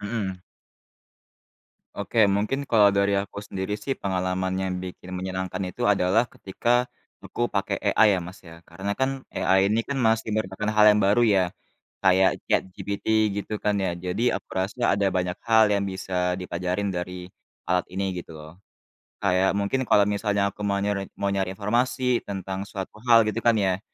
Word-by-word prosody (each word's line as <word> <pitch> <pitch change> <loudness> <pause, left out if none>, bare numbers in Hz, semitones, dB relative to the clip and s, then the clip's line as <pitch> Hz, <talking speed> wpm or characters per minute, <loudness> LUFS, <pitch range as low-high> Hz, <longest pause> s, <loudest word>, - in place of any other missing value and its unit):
Mhm. 100 -3 -3 1.6
Oke, 110 -3 +2
mungkin 110 +8 -1
kalau 105 -3 +5
dari 100 0 +2
aku 100 +1 -3
sendiri 95 -1 -5
sih, 135 +5 -3
pengalaman 95 -1 -1
yang 95 -1 -2
bikin 90 0 -8
menyenangkan 95 +1 -4
itu 120 +3 -1
adalah 100 +4 +3
ketika 120 +6 0 0.4
aku 120 0 -2
pakai 100 -1 -2
AI 110 - +4
ya 90 - -1
Mas, 90 +2 -9
ya. 85 -1 -13
Karena 95 +4 -4
kan, 130 +2 -2
AI 95 +2 +2
ini 110 - +2
kan 140 - -2
masih 110 -3 +1
merupakan 105 0 -2
hal 105 0 +4
yang 105 - +2
baru 105 +5 +4
ya, 100 -4 +4 0.6
kayak 95 0 +5
ChatGPT 95 +1 -2 0.3
gitu 105 +1 -5
kan, 105 -1 +2
ya. 95 -3 0
Jadi 90 +5 -3
aku - - -10
rasa 100 +6 0
ada 100 0 +1
banyak 90 -1 -1
hal 110 -1 +6
yang 100 0 0
bisa 90 -1 -2
dipelajarin 90 +3 -2
dari 90 0 -6 0.4
alat 90 0 +1
ini 100 +1 -1 0.2
gitu 85 - -13
loh. 75 +1 -11 0.7
Kayak 95 0 +3
mungkin 100 +6 0
kalau 100 - +5
misalnya 100 0 0
aku - - -21
mau 100 0 +1
nyari 100 -1 -2
mau 100 0 -1
nyari 95 -1 -1
informasi 120 +4 +1
tentang 95 0 -5
suatu 95 -1 -7
hal 115 -1 +7
gitu 110 +2 -2
kan 115 -1 +3
ya, 95 -2 +1
100 Hz, 170 wpm, -25 LUFS, 95-105 Hz, 1.6 s, hal